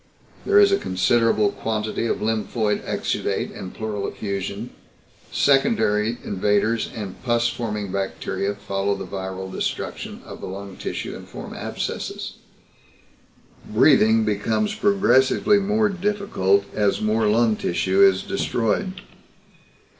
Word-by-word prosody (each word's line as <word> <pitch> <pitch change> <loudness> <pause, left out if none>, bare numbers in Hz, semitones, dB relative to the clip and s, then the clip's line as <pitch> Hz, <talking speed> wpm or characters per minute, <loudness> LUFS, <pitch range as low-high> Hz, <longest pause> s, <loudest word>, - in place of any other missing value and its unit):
There 410 0 +6
is 405 -1 +6
a 395 - +3
considerable 105 +2 +2
quantity 110 +1 -2
of - - -1
lymphoid 110 -1 0
exudate - - -2
and 90 - -7
pleural 105 -2 -4
effusion. 100 +3 -4 0.6
Secondary 120 - +2
invaders 105 +3 +1
and 100 -4 -6
pus 120 -1 +2
forming 105 -4 -4
bacteria 100 +1 -2
follow 100 0 -1
the 95 -1 -6
viral 95 0 -5
destruction - - -4
of - - -10
the - - -5
lung 95 0 -7
tissue - - -5
and - - -10
form - - -8
abscesses. - - -4 1.3
Breathing 110 0 +5
becomes 110 - 0
progressively 200 -3 +3
more 210 +2 +2
difficult 185 - +1
as 105 -2 +1
more 110 0 +1
lung 110 +1 +3
tissue 95 0 +1
is 95 -1 +5
destroyed. 180 - -1
110 Hz, 115 wpm, -23 LUFS, 100-120 Hz, 1.3 s, There